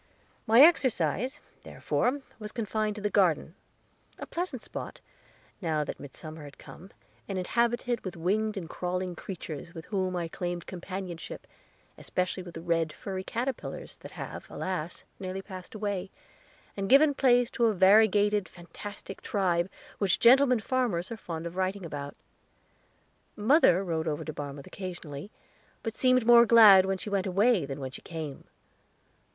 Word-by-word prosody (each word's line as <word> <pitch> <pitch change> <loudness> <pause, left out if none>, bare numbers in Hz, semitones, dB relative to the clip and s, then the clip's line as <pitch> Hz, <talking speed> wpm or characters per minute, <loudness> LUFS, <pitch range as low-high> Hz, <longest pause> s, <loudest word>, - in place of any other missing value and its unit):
My 225 +4 +7
exercise, 260 - +3 0.2
therefore, 270 +4 -1 0.2
was 210 -1 -7
confined 215 -2 -2
to 210 - -8
the 210 - +1
garden 170 -5 +2 0.6
a - - -6
pleasant 335 -9 -4
spot, - - -7 0.6
now 160 -4 0
that - - -6
midsummer 155 +2 -9
had 145 -1 -11
come, 185 - -13 0.4
and 195 - -3
inhabited 235 +4 0
with 185 -3 -6
winged 210 +5 0
and 175 -4 -5
crawling 180 +1 -3
creatures, 170 -3 -7
with 165 - -8
whom 185 -3 -1
I 170 -1 -2
claimed 175 +1 -4
companionship, 185 -1 -7 0.5
especially 185 +1 -2
with 175 -2 -10
the 165 - -7
red, 165 -2 +1
furry 190 +3 -6
caterpillars, 245 +5 -4
that - - -12
have, - - -8
alas, 180 -3 -4 0.2
nearly 190 0 -5
passed 185 +1 -10
away, 200 -3 -3 0.7
and 195 -1 -3
given 285 +2 +6
place 245 -3 +3
to 235 - +1
a 220 - +2
variegated, 205 +1 +4
fantastic 195 +3 -10
tribe, 180 -3 0 0.3
which 195 -4 +2
gentleman 250 -1 +6
farmers 235 -8 -1
are - - -3
fond 170 -6 -6
of 170 +1 -6
writing 190 0 -2
about. 145 -3 -6 1.2
Mother 210 - +4
rode 165 -3 -2
over 150 -2 -2
to 155 - -5
Barmouth 140 -1 -7
occasionally, 175 -4 -7 0.5
but 225 - -3
seemed 255 -1 +3
more 235 0 +8
glad 205 -5 +8
when 195 0 0
she 205 - -7
went 195 -1 0
away 195 - +3
than 135 0 -5
when 130 -1 -5
she - - -9
came. 155 -4 -7
190 Hz, 150 wpm, -29 LUFS, 170-220 Hz, 1.2 s, more